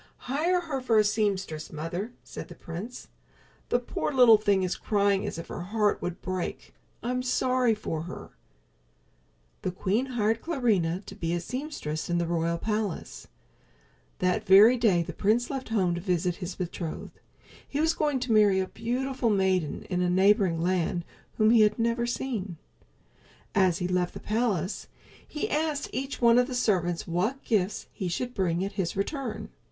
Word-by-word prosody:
"Hire 330 +8 +1
her 295 -6 -3
for 235 -3 +2
a 215 - +6
seamstress, 200 -7 -1
mother," 170 +8 -4
said - - -8
the 175 - -11
prince. 180 +10 -8 0.6
"The - - +3
poor 245 +4 -3
little 245 -5 +7
thing 200 -3 +2
is 185 - -1
crying 200 -2 +1
as - - -4
if 165 - -7
her - - -5
heart 205 +3 0
would 180 +1 -5
break. 185 -1 -4 0.3
I'm 250 +1 -1
sorry 250 -2 +2
for 165 -7 -4
her." 175 - -9 1.3
The - - -1
queen 200 +7 0
hired 225 -3 0
Clarinha 210 - 0
to - - -9
be 170 -4 -2
a - - -1
seamstress 210 - -4
in 175 - +1
the 170 - +1
royal 170 0 0
palace. 210 -1 -3 0.9
That 185 +4 +1
very 210 +5 +8
day 210 -8 +3
the - - -7
prince 225 +6 +1
left 265 -3 -4
home 190 -6 +1
to 170 - -3
visit 180 -1 0
his 185 -2 -5
betrothed. 170 -2 -5 0.5
He 285 - -3
was 320 +1 +3
going 295 -4 0
to 250 - -2
marry 205 -3 +5
a 190 - -1
beautiful 255 +2 -1
maiden 190 -6 +1
in 180 -2 -2
a 180 - +2
neighboring 190 -2 +3
land, 175 0 0 0.3
whom 215 0 +5
he 230 -2 +6
had 210 0 +4
never 235 +1 0
seen. 220 -8 -3 1.0
As 185 -3 +3
he 180 -2 -2
left 180 -1 0
the - - -5
palace 215 -5 -1 0.4
he 300 - -3
asked 300 -1 -1
each 270 +1 -3
one 235 0 +6
of 250 - +2
the 255 - -4
servants 180 -8 +1
what 190 +11 -1
gifts 210 -3 0
he 185 - -3
should 245 +8 -3
bring 185 -3 0
at 200 - -4
his 190 -4 -2
return. 255 +4 -3
205 Hz, 170 wpm, -28 LUFS, 180-245 Hz, 1.3 s, very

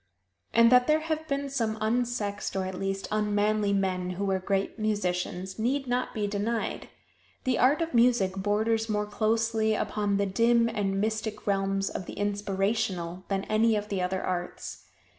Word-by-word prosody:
And 230 +1 +6
that 250 0 +6
there 310 +1 +3
have 315 0 -3
been 280 -1 -1
some 230 -5 -1
unsexed, 220 -3 -1
or 190 -1 0
at 190 - -4
least 195 0 -2
unmanly 210 0 +1
men, 185 -2 0
who 200 - -1
were 190 -1 +1
great 195 +3 -1
musicians, 190 -2 -2
need 265 +5 0
not 250 0 -1
be 210 -2 0
denied. 210 +3 -2 0.5
The 255 -1 +1
art 285 +7 +4
of 330 - -5
music 235 -6 +3
borders 220 +3 0
more 210 -1 0
closely 220 +1 +1
upon 205 -2 0
the 200 - +1
dim 230 +4 +3
and 200 -4 -1
mystic 215 0 -2
realms 195 -1 0
of 185 - -5
the - - -6
inspirational 195 -3 -1
than 195 -1 -1
any 220 +1 +2
of 210 0 -3
the 195 -2 -1
other 185 +1 -1
arts. 180 -1 -4
210 Hz, 165 wpm, -28 LUFS, 195-230 Hz, 0.5 s, And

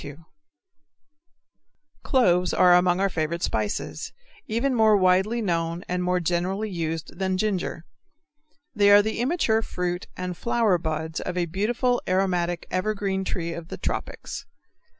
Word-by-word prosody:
_ 145 +3 -10 1.8
Cloves 180 - +2
are 180 -1 +6
among 180 0 +4
our 195 - +3
favorite 170 -1 -2
spices, 105 -7 -2 0.4
even 240 +5 0
more 220 -3 +5
widely 190 +5 +2
known 170 -1 -1
and 180 0 -1
more 180 0 +1
generally 180 +5 -1
used 165 -1 -4
than 190 -1 0
ginger. 185 -5 -2 0.9
They 205 -3 +4
are 205 0 +8
the 220 +1 -3
immature 245 -4 +1
fruit 180 -3 -3
and 180 -1 -4
flower 225 -3 +1
buds 160 0 -3
of 180 0 -4
a 175 - +1
beautiful 230 +8 0
aromatic 180 -2 0
evergreen 195 0 -1
tree 170 -2 -3
of 170 -1 -7
the - - -7
tropics. - - -5
180 Hz, 135 wpm, -25 LUFS, 170-210 Hz, 1.8 s, are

